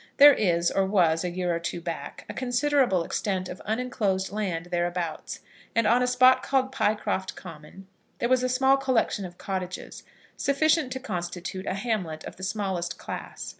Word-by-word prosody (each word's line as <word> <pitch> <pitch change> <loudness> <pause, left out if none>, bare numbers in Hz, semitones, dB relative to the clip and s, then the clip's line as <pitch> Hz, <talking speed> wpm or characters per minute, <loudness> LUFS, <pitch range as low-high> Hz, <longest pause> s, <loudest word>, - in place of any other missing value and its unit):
There 290 0 +10
is, 175 -7 +2
or 195 - +2
was 180 -4 +2
a 180 - -1
year 175 -1 -1
or - - -2
two 170 +1 -4
back, 165 -4 -6
a - - -6
considerable 255 - +2
extent 185 +1 -2
of 180 - -8
unenclosed 215 -5 -1
land 180 -5 -3
thereabouts, 175 -2 -2 0.3
and 230 -1 +3
on 235 +3 +4
a 250 - +2
spot 255 +1 +5
called 265 -1 +1
Pycroft 210 -6 -1
Common 165 +2 -11 0.3
there 235 - 0
was 255 0 +3
a 255 - 0
small 265 +2 +4
collection 255 -7 0
of 175 -1 -10
cottages, 185 -2 -5 0.3
sufficient 300 0 +2
to 260 - -4
constitute 185 -4 -5
a - - -1
hamlet 195 -7 -2
of - - -9
the - - -12
smallest 190 -3 -2
class. - - -7
195 Hz, 170 wpm, -26 LUFS, 175-250 Hz, 0.3 s, There